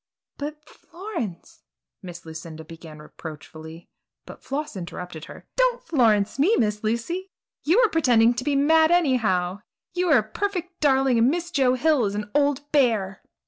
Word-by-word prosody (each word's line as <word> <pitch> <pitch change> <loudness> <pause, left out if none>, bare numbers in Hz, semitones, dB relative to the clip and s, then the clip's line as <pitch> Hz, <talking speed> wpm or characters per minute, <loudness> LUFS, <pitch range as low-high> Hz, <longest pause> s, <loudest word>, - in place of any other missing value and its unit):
"But 300 +1 -7
Florence!" 335 - -8 0.4
Miss 175 -3 -10
Lucinda 160 0 -9
began 160 -1 -12
reproachfully, 160 +2 -11 0.4
but - - -12
Floss 295 0 -4
interrupted 175 -3 -7
her: - - -12
"Don't - - +1
'Florence' 220 -5 +2
me, 375 +11 +4
Miss 210 -1 0
Lucy! 235 - -2 0.3
You're 370 +11 +4
just 450 - +3
pretending 240 -7 +4
to 245 +1 -4
be 290 +1 0
mad 315 +3 +4
anyhow. 225 - +1 0.3
You 360 0 0
are 295 - +6
a 215 - +2
perfect 360 - -4
darling 270 -4 +3
and 235 +3 +4
Miss 345 +3 -2
Joe 260 -5 +2
Hill 290 -2 +2
is 200 0 -2
an 210 0 -5
old 290 0 0
bear!" 220 -9 +1
250 Hz, 155 wpm, -24 LUFS, 195-315 Hz, 0.4 s, are